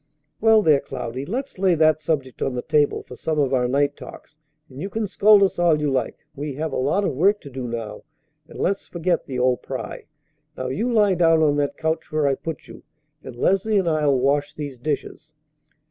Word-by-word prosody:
"Well, 220 Hz, -1 st, +5 dB
there, 150 Hz, -5 st, +5 dB
Cloudy, 130 Hz, 0 st, -6 dB
let's 255 Hz, +2 st, -4 dB
lay 185 Hz, -2 st, +3 dB
that 155 Hz, -1 st, +3 dB
subject 145 Hz, -5 st, -3 dB
on 130 Hz, -, -1 dB
the 125 Hz, -, -3 dB
table 150 Hz, -1 st, +1 dB
for 125 Hz, -, -11 dB
some 155 Hz, +3 st, -3 dB
of 140 Hz, -3 st, +1 dB
our 125 Hz, -1 st, +2 dB
night 140 Hz, +2 st, +1 dB
talks; 150 Hz, -, -13 dB, 0.3 s
and 135 Hz, 0 st, -10 dB
you 195 Hz, -, -4 dB
can 220 Hz, +1 st, -2 dB
scold 205 Hz, +1 st, +5 dB
us 190 Hz, -, 0 dB
all 170 Hz, -3 st, +3 dB
you 150 Hz, -2 st, 0 dB
like. 130 Hz, -3 st, -3 dB
We 145 Hz, -1 st, -5 dB
have 155 Hz, +2 st, -3 dB
a -, -, -1 dB
lot 145 Hz, +10 st, +1 dB
of 190 Hz, -, 0 dB
work 195 Hz, +9 st, +3 dB
to 140 Hz, -, -11 dB
do 130 Hz, -1 st, -5 dB
now, 115 Hz, -3 st, -5 dB, 0.5 s
and -, -, -12 dB
let's 195 Hz, +1 st, -1 dB
forget 175 Hz, +1 st, -1 dB
the 130 Hz, -3 st, -4 dB
old 125 Hz, 0 st, +1 dB
pry. -, -, -6 dB, 0.5 s
Now 130 Hz, 0 st, -3 dB
you 225 Hz, -, -1 dB
lie 210 Hz, -4 st, +4 dB
down 165 Hz, -2 st, +3 dB
on 145 Hz, -2 st, +3 dB
that 145 Hz, -1 st, -1 dB
couch 160 Hz, 0 st, -2 dB
where 155 Hz, -1 st, +1 dB
I 140 Hz, -, +3 dB
put 160 Hz, +3 st, -6 dB
you, -, -, -12 dB, 0.4 s
and 130 Hz, -, -9 dB
Leslie 195 Hz, -, +1 dB
and 190 Hz, -3 st, +1 dB
I'll 150 Hz, -4 st, +2 dB
wash 140 Hz, +3 st, 0 dB
these 145 Hz, -4 st, -7 dB
dishes." 155 Hz, +2 st, -5 dB
150 Hz, 215 wpm, -22 LUFS, 135-180 Hz, 0.5 s, Well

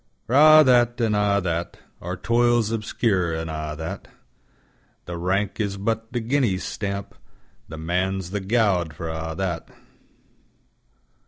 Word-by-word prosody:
For 120 Hz, -, -5 dB
a' 155 Hz, +2 st, +8 dB
that, 120 Hz, -2 st, +3 dB
an' 115 Hz, -2 st, +1 dB
a' 105 Hz, -1 st, +2 dB
that. 85 Hz, -1 st, -3 dB, 0.2 s
Our 90 Hz, +1 st, -5 dB
toils 120 Hz, 0 st, +2 dB
obscure 100 Hz, -6 st, 0 dB
an' 80 Hz, 0 st, -4 dB
a' 75 Hz, -1 st, -4 dB
that, 80 Hz, +1 st, -6 dB, 1.0 s
The 85 Hz, -, -6 dB
rank 95 Hz, +5 st, -1 dB
is 100 Hz, -2 st, -2 dB
but 115 Hz, +2 st, -2 dB
the 120 Hz, -, -1 dB
guinea's 115 Hz, -5 st, 0 dB
stamp, 100 Hz, -1 st, -4 dB, 0.5 s
The 80 Hz, -, -8 dB
Man's 90 Hz, +3 st, -2 dB
the 105 Hz, -, -2 dB
gowd 95 Hz, -6 st, +1 dB
for 80 Hz, +1 st, -5 dB
a' 80 Hz, 0 st, -4 dB
that. 90 Hz, -4 st, -3 dB
100 Hz, 140 wpm, -23 LUFS, 85-115 Hz, 1.0 s, a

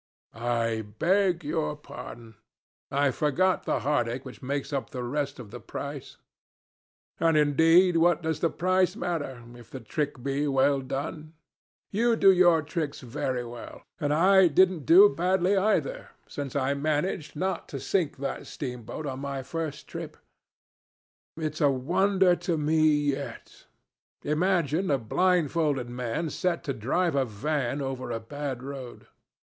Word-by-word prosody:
"I 115 Hz, -1 st, -1 dB, 0.2 s
beg 185 Hz, -, +2 dB
your 150 Hz, 0 st, -1 dB
pardon. 120 Hz, -5 st, -10 dB, 0.6 s
I 140 Hz, 0 st, +2 dB
forgot 175 Hz, +8 st, +1 dB
the -, -, 0 dB
heartache 130 Hz, -3 st, -1 dB
which 130 Hz, -, -10 dB
makes 140 Hz, +2 st, -3 dB
up 135 Hz, -, -2 dB
the 125 Hz, -2 st, -5 dB
rest 140 Hz, +3 st, -2 dB
of 115 Hz, -5 st, -10 dB
the 120 Hz, -, -8 dB
price. 140 Hz, +6 st, -7 dB, 1.0 s
And 165 Hz, -1 st, +3 dB
indeed 165 Hz, +4 st, +5 dB
what 170 Hz, 0 st, +3 dB
does 160 Hz, -1 st, -1 dB
the 165 Hz, -, +2 dB
price 185 Hz, +2 st, +1 dB
matter, 145 Hz, -, -4 dB
if 120 Hz, -1 st, -14 dB
the 130 Hz, -, -7 dB
trick 140 Hz, +2 st, -3 dB
be 140 Hz, +2 st, -1 dB
well 135 Hz, 0 st, +2 dB
done? 150 Hz, +4 st, -5 dB, 0.6 s
You 230 Hz, +3 st, +2 dB
do 195 Hz, -, +6 dB
your 175 Hz, -4 st, +4 dB
tricks 155 Hz, -2 st, -4 dB
very 125 Hz, -1 st, -3 dB
well. 120 Hz, 0 st, -10 dB, 0.2 s
And 145 Hz, -1 st, 0 dB
I 185 Hz, +4 st, +5 dB
didn't 185 Hz, +2 st, +3 dB
do 375 Hz, +5 st, +9 dB
badly 185 Hz, -, +1 dB
either, 220 Hz, -, 0 dB, 0.2 s
since 140 Hz, -2 st, -6 dB
I 140 Hz, 0 st, +1 dB
managed 150 Hz, +3 st, -2 dB
not 190 Hz, +5 st, -2 dB
to -, -, -5 dB
sink 170 Hz, -8 st, -1 dB
that 135 Hz, 0 st, -4 dB
steamboat 125 Hz, +2 st, -6 dB
on 135 Hz, -2 st, -4 dB
my 140 Hz, -1 st, -4 dB
first 160 Hz, +1 st, -5 dB
trip. -, -, -7 dB, 1.2 s
It's 155 Hz, 0 st, -3 dB
a 145 Hz, -, +5 dB
wonder 180 Hz, +7 st, +2 dB
to 175 Hz, -1 st, -1 dB
me 155 Hz, +1 st, +3 dB
yet. 145 Hz, -2 st, -3 dB, 0.6 s
Imagine 170 Hz, +2 st, +1 dB
a 140 Hz, -, +3 dB
blindfolded 150 Hz, -1 st, +1 dB
man 125 Hz, +6 st, -3 dB
set 180 Hz, -2 st, -1 dB
to 140 Hz, -, -2 dB
drive 165 Hz, +11 st, 0 dB
a 140 Hz, -1 st, +2 dB
van 140 Hz, +4 st, -2 dB
over 130 Hz, -2 st, -4 dB
a 115 Hz, -1 st, -2 dB
bad 135 Hz, +1 st, -5 dB
road. 135 Hz, -3 st, -8 dB
150 Hz, 145 wpm, -27 LUFS, 135-175 Hz, 1.2 s, do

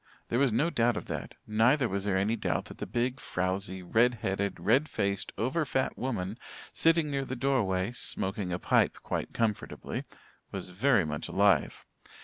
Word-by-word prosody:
There 120 Hz, -, +1 dB
was 135 Hz, -3 st, +3 dB
no 150 Hz, +10 st, +2 dB
doubt 120 Hz, -4 st, +2 dB
of -, -, -4 dB
that; -, -, -5 dB
neither 120 Hz, +5 st, +3 dB
was 100 Hz, -1 st, -2 dB
there 95 Hz, -2 st, +1 dB
any 100 Hz, +4 st, +1 dB
doubt 115 Hz, -, -1 dB
that -, -, -11 dB
the -, -, -4 dB
big, 125 Hz, +2 st, -1 dB
frowzy, 95 Hz, -1 st, -2 dB
red 120 Hz, +7 st, +3 dB
headed, 100 Hz, -2 st, -2 dB
red 135 Hz, +8 st, +3 dB
faced, 100 Hz, -1 st, -1 dB
over 140 Hz, +9 st, +1 dB
fat 135 Hz, -2 st, 0 dB
woman 110 Hz, -4 st, -3 dB, 0.3 s
sitting 165 Hz, -2 st, +3 dB
near 140 Hz, -1 st, 0 dB
the 130 Hz, -1 st, -4 dB
door 135 Hz, -1 st, +2 dB
way, 95 Hz, +2 st, 0 dB
smoking 95 Hz, -5 st, -3 dB
a 85 Hz, -, 0 dB
pipe -, -, +2 dB
quite -, -, -3 dB
comfortably, 110 Hz, -3 st, -2 dB, 0.5 s
was -, -, -5 dB
very 105 Hz, +1 st, +3 dB
much 75 Hz, -1 st, -3 dB
alive. 100 Hz, -5 st, +2 dB
110 Hz, 175 wpm, -30 LUFS, 95-130 Hz, 0.5 s, was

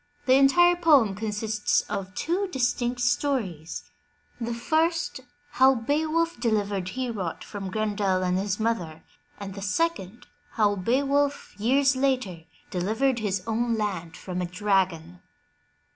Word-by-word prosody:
The 255 Hz, -, +4 dB
entire 350 Hz, +7 st, +5 dB
poem 295 Hz, -, +4 dB
consists 210 Hz, +1 st, 0 dB
of 185 Hz, -1 st, -6 dB
two 370 Hz, +5 st, -1 dB
distinct 245 Hz, -4 st, -1 dB
stories, 245 Hz, -, -1 dB, 0.3 s
— -, -, -30 dB
the 230 Hz, +1 st, -2 dB
first 320 Hz, +6 st, 0 dB, 0.3 s
how 265 Hz, +1 st, +5 dB
Beowulf 310 Hz, +5 st, 0 dB
delivered 205 Hz, -5 st, 0 dB
Heorot 220 Hz, -7 st, -4 dB
from 200 Hz, -2 st, -6 dB
Grendel 200 Hz, -2 st, 0 dB
and 180 Hz, 0 st, +1 dB
his 200 Hz, +1 st, -2 dB
mother, 185 Hz, -9 st, -2 dB, 0.4 s
and 200 Hz, -1 st, -6 dB
the 200 Hz, -, -8 dB
second, 230 Hz, -, -2 dB, 0.3 s
how 205 Hz, -2 st, +2 dB
Beowulf, 280 Hz, +8 st, 0 dB
years 270 Hz, +5 st, +3 dB
later, 255 Hz, -11 st, -1 dB, 0.3 s
delivered 225 Hz, +8 st, 0 dB
his 200 Hz, -3 st, -2 dB
own 230 Hz, +1 st, 0 dB
land 185 Hz, -6 st, -3 dB
from 180 Hz, -1 st, -5 dB
a 180 Hz, -, -2 dB
dragon. 180 Hz, -3 st, -1 dB
220 Hz, 130 wpm, -26 LUFS, 195-270 Hz, 0.4 s, entire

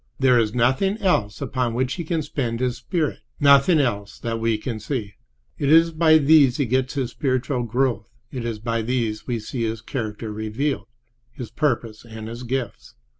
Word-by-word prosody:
There 130 Hz, -2 st, +5 dB
is 110 Hz, -1 st, 0 dB
nothing 130 Hz, -, +2 dB
else 145 Hz, -, 0 dB
upon 125 Hz, -3 st, -1 dB
which 130 Hz, +2 st, 0 dB
he 170 Hz, -, -4 dB
can 160 Hz, -1 st, -1 dB
spend 120 Hz, -5 st, -3 dB
his 125 Hz, -1 st, -1 dB
spirit—nothing 150 Hz, -2 st, +2 dB
else 105 Hz, -7 st, -1 dB
that 115 Hz, -1 st, -3 dB
we 115 Hz, -1 st, +1 dB
can 110 Hz, 0 st, -5 dB
see. 110 Hz, -2 st, -4 dB, 0.5 s
It 140 Hz, -, +1 dB
is 165 Hz, +1 st, +6 dB
by 160 Hz, -1 st, +5 dB
these 145 Hz, -3 st, +5 dB
he 140 Hz, -, +1 dB
gets 130 Hz, +3 st, 0 dB
his 130 Hz, -3 st, -2 dB
spiritual 130 Hz, -1 st, -1 dB
growth; 120 Hz, -1 st, -1 dB, 0.2 s
it 125 Hz, -4 st, -5 dB
is 115 Hz, -2 st, -3 dB
by 115 Hz, +1 st, -2 dB
these 115 Hz, -2 st, -2 dB
we 120 Hz, -2 st, -1 dB
see 115 Hz, +3 st, -5 dB
his 110 Hz, -1 st, -2 dB
character 110 Hz, -2 st, -5 dB
revealed, 110 Hz, +3 st, -2 dB, 0.4 s
his 120 Hz, -1 st, -8 dB
purpose 120 Hz, -7 st, -1 dB
and 110 Hz, -2 st, -9 dB
his 115 Hz, +1 st, -7 dB
gifts. 125 Hz, -2 st, -4 dB
125 Hz, 175 wpm, -23 LUFS, 115-140 Hz, 0.5 s, is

